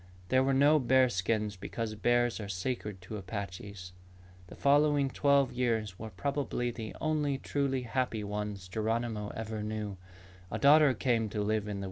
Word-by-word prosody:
There 130 0 +4
were 135 0 +2
no 145 +3 +5
bear 130 0 +4
skins 105 0 -1
because 110 +3 -4
bears 120 +2 +1
are 100 -2 -6
sacred 100 0 -3
to 105 +4 -6
Apaches. 95 -1 -7 0.5
The - - -11
following 145 -1 +3
twelve 140 -1 +3
years 115 -6 -1
were 110 - -6
probably 130 +2 -2
the 110 -2 -7
only 150 -3 0
truly 135 -2 -1
happy 120 -2 -1
ones 105 -2 -4
Geronimo 110 +1 -2
ever 110 -1 -4
knew. 105 -2 -4
115 Hz, 125 wpm, -31 LUFS, 105-130 Hz, 0.5 s, no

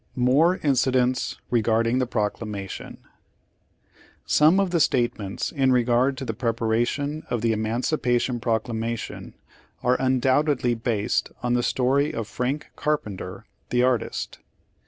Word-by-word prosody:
MOEE 140 +9 +3
INCIDENTS 130 -2 +1
KEGAEDING 115 +1 +2
THE 130 - 0
PEOGLAMATION 105 -3 -4 1.3
Some 155 +6 +4
of 195 -3 +1
the 170 - +2
statements 120 -8 0
in 135 -3 +2
regard 125 +2 +2
to 135 - -5
the 110 - -2
prep 115 0 -2
aration 120 +7 0
of 120 - -1
the 115 0 +2
Emancipation 120 +2 0
Proclamation 115 0 -3 0.5
are 125 +1 +2
un 130 -1 +2
doubtedly 130 -1 +2
based 110 -2 -1
on 120 0 +1
the 120 - +2
story 135 +4 +1
of 115 -2 -3
Frank 130 +6 -3
Carpenter, 105 -11 -3 0.2
the 125 0 +2
artist. 125 -3 -1
125 Hz, 125 wpm, -24 LUFS, 115-135 Hz, 1.3 s, Some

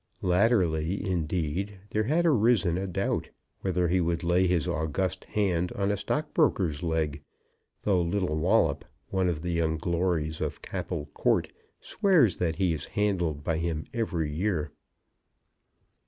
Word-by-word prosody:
Latterly, 90 -3 +2
indeed, 90 +2 -2
there 110 0 +1
had 160 +7 +2
arisen 115 - +3
a 95 +2 -2
doubt 90 - -1 0.3
whether 90 -2 0
he 90 +2 +2
would 85 0 -1
lay 90 +2 +3
his 85 -4 +1
august 80 +4 -2
hand 90 -4 0
on 100 0 0
a - - +1
stockbroker's 100 - 0
leg; 80 -3 -1 0.6
though 95 -4 +3
little 85 -1 0
Wallop, 80 - +2 0.3
one 95 -2 +1
of 80 -2 -3
the 90 - -2
young 80 -1 0
glories 85 -2 -1
of - - -3
Capel 75 - -4
Court, - - +1 0.3
swears 165 - +3
that 80 -3 0
he 90 0 +1
is 80 - -4
handled 90 -8 0
by 80 +1 0
him 85 -2 -2
every 90 - -1
year. 80 -3 -1
90 Hz, 140 wpm, -28 LUFS, 80-100 Hz, 0.6 s, arisen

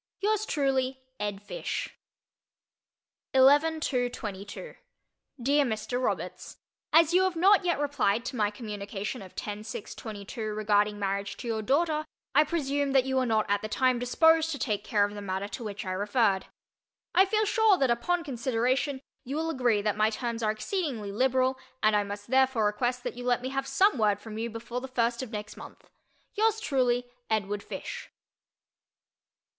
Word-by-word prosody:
Yours 430 +1 +1
truly, 265 -2 0 0.2
ED. 205 -1 -3
FISH. - - -4 1.4
11 290 +5 +5
2 250 -5 0
22 205 - -7 0.7
DEAR 285 +4 +3
MR. 245 +1 -2
ROBERTS: - - -3 0.3
As 330 +1 +5
you 365 - +5
have 375 -2 +1
not 385 +4 +6
as 370 - -12
yet 345 - +1
replied 275 -6 +1
to 260 - -4
my 210 -3 +2
communication 210 +1 -5
of 185 -2 -12
10 210 0 -5
6 215 -1 -7
22 215 +1 -7
regarding 210 -1 +2
marriage 200 0 -2
to - - -7
your 225 -1 -1
daughter, 305 +6 +1 0.3
I 295 +3 +6
presume 285 -3 -1
that 265 -2 +5
you 265 0 0
were 255 -1 +2
not 220 -2 +2
at 205 0 +1
the 215 - -4
time 255 +1 +2
disposed 320 +6 +4
to 300 - -2
take 210 -6 -1
care 205 -2 +2
of 205 - -6
the 205 - -7
matter 195 0 -3
to 240 - -6
which 210 -1 -5
I 185 - -3
referred. 205 0 +1 0.7
I 375 +2 +6
feel 430 +2 +2
sure 430 -2 +4
that 265 -6 +2
upon 340 +9 0
consideration 260 +1 0 0.2
you 270 +2 -5
will 325 +1 -1
agree 240 -8 +1
that 210 -1 +1
my 215 +1 +3
terms 235 +1 -3
are 215 - +1
exceedingly 225 - -2
liberal 260 +3 +1 0.2
and 215 0 +4
I 205 - +3
must 205 +3 -7
therefore 260 -4 +3
request 245 +4 0
that - - -4
you 245 - -6
let 245 0 +1
me 260 - -2
have 270 0 -2
some 390 - +3
word 205 -2 +2
from 220 0 -8
you 230 +1 -2
before 235 +2 -5
the 265 - -6
first 235 -2 0
of 260 - -5
next 210 -1 -6
month. - - -12 0.4
Yours 440 +1 +2
truly, 250 - +1 0.2
EDWARD 205 -2 -1
FISH. - - -7
245 Hz, 180 wpm, -28 LUFS, 210-280 Hz, 1.4 s, not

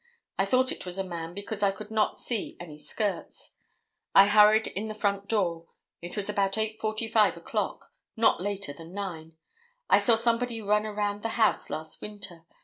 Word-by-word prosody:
I 195 - +3
thought 255 +5 +2
it - - -6
was 180 0 -2
a 195 - 0
man 170 -2 -6
because 205 +1 -5
I 200 - +4
could 210 +2 -7
not 215 -1 +1
see 230 -5 -3
any 155 -4 -9
skirts. 205 +6 -3 0.6
I 195 - +10
hurried 210 +2 +6
in 210 +3 -4
the 215 - -5
front 200 -1 -1
door. 170 -6 0 0.3
It 175 +1 -7
was 205 - +2
about 200 -2 +1
8:45 220 0 +1
o'clock; - - -4 0.2
not 220 -5 +3
later 200 -5 -3
than 165 +5 -12
9. 165 -5 -6 0.5
I - - +7
saw 235 - +4
somebody 230 +1 0
run 210 0 +1
around 205 -1 -2
the 225 +2 -3
house 220 -2 +2
last 155 0 -5
winter. 190 -5 -9
205 Hz, 175 wpm, -28 LUFS, 185-220 Hz, 0.6 s, I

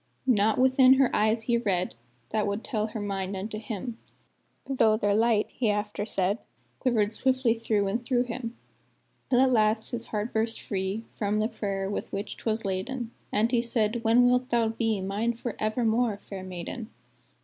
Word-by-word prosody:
Naught 220 -4 +3
within 260 0 +6
her 265 -1 +3
eyes 220 +2 +2
he 235 +1 +2
read 185 -5 0 0.4
That 215 -1 +1
would 200 +2 -2
tell 215 -2 -1
her 220 0 -6
mind 195 -1 -3
unto 215 +3 -4
him; 225 +2 -5 0.7
Though 225 -5 +3
their 205 -2 +1
light, 220 0 +3
he 235 -4 0
after 210 0 -1
said, 200 0 0 0.4
Quivered 225 -4 +1
swiftly 260 -1 +2
through 225 -3 0
and 230 +5 -1
through 245 0 +2
him; 235 -1 -6 0.7
Till 250 - +4
at 265 -1 +4
last 220 -1 +2
his 235 -2 -3
heart 215 +2 -3
burst 225 +1 0
free 195 +2 -3 0.2
From 210 0 +1
the 215 - +2
prayer 195 -4 -3
with 200 - -4
which 200 +2 -4
'twas 225 -1 -2
laden, 225 +6 -3 0.2
And 220 +3 +2
he 240 -2 +3
said, 230 -1 0
"When 235 +2 +5
wilt 250 +1 +2
thou 230 -2 +2
be 225 -2 -1
Mine 205 +5 -1
for 235 -1 -5
evermore, 220 0 +1
fair 195 -1 -8
maiden?" 185 +5 -6
220 Hz, 175 wpm, -27 LUFS, 205-235 Hz, 0.7 s, within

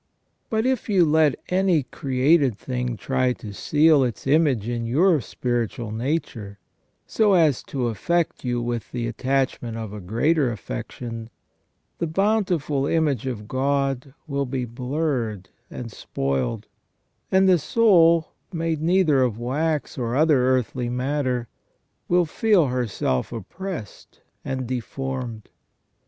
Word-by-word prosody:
But 220 0 0
if 260 -3 0
you 190 -4 +5
let 155 -3 +3
any 180 -4 +2
created 135 -1 +2
thing 125 -2 -3
try 130 0 0
to 105 -4 -9
seal 150 +5 +4
its 120 -5 -3
image 135 -6 +2
in 120 -1 -2
your 160 +5 +3
spiritual 120 -2 -3
nature, 115 -4 -3 0.5
so 215 -3 +2
as 155 -6 +3
to 135 -3 -3
aflFect 165 - -1
you 120 -1 -1
with 120 -1 -3
the 120 -1 -3
attachment 125 -1 -1
of 110 -2 -6
a 105 - -6
greater 125 - +1
affection, 115 - -6 0.7
the 170 - 0
beautiful 175 -6 +1
image 145 -7 +1
of 105 -5 -5
God 135 0 -1
will 140 -2 -2
be 125 0 -2
blurred 125 - -2 0.2
and 115 -2 -7
spoiled; 70 -9 -2 0.7
and 190 0 +4
the 180 -2 +5
soul, 170 -3 +4 0.2
made 165 -2 -2
neither 165 -5 +3
of 120 -4 +1
wax 145 +5 -2
or 120 0 -1
other 145 -4 +4
earthly 125 -1 0
matter, 125 -1 -1 0.6
will 175 0 +3
feel 195 +1 +3
herself 115 - -1
oppressed 125 - -7 0.2
and 130 -1 -3
deformed. 125 -2 -5
130 Hz, 125 wpm, -23 LUFS, 120-160 Hz, 0.7 s, you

